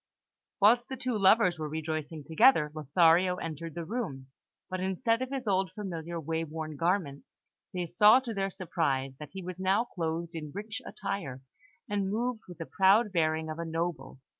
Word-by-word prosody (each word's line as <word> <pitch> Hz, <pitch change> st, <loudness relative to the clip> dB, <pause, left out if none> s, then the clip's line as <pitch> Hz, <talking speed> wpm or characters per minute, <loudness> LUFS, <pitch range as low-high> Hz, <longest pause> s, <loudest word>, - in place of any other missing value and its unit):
Whilst 235 Hz, +4 st, +5 dB
the 265 Hz, -, -5 dB
two 255 Hz, -2 st, -2 dB
lovers 190 Hz, -3 st, +4 dB
were 155 Hz, -1 st, -3 dB
rejoicing 155 Hz, 0 st, -4 dB
together, 165 Hz, -, +4 dB
Lothario 165 Hz, +4 st, +3 dB
entered 165 Hz, -2 st, -6 dB
the 170 Hz, -1 st, -4 dB
room; 155 Hz, -, -5 dB, 0.4 s
but 185 Hz, 0 st, -4 dB
instead 225 Hz, +6 st, 0 dB
of 260 Hz, -, -2 dB
his 265 Hz, -3 st, -4 dB
old 190 Hz, -2 st, +1 dB
familiar, 170 Hz, -4 st, -5 dB
way 160 Hz, +1 st, -2 dB
worn 155 Hz, -1 st, -6 dB
garments, 165 Hz, -3 st, -2 dB, 0.3 s
they 180 Hz, -2 st, -2 dB
saw, 210 Hz, +8 st, +6 dB
to 240 Hz, -3 st, -5 dB
their 195 Hz, -1 st, -1 dB
surprise, 150 Hz, -8 st, -1 dB
that 150 Hz, -2 st, -8 dB
he 190 Hz, -1 st, -6 dB
was 185 Hz, 0 st, -7 dB
now 190 Hz, +4 st, +2 dB
clothed 170 Hz, -4 st, -4 dB
in 150 Hz, -3 st, -6 dB
rich 215 Hz, +2 st, -5 dB
attire, 140 Hz, -11 st, -5 dB, 0.4 s
and 200 Hz, -2 st, -1 dB
moved 230 Hz, +2 st, -1 dB
with 175 Hz, -2 st, -10 dB
the 165 Hz, -, -5 dB
proud 200 Hz, +5 st, +4 dB
bearing 160 Hz, -2 st, +1 dB
of 155 Hz, +1 st, -5 dB
a -, -, -2 dB
noble. 165 Hz, -5 st, -3 dB
175 Hz, 175 wpm, -30 LUFS, 160-205 Hz, 0.4 s, saw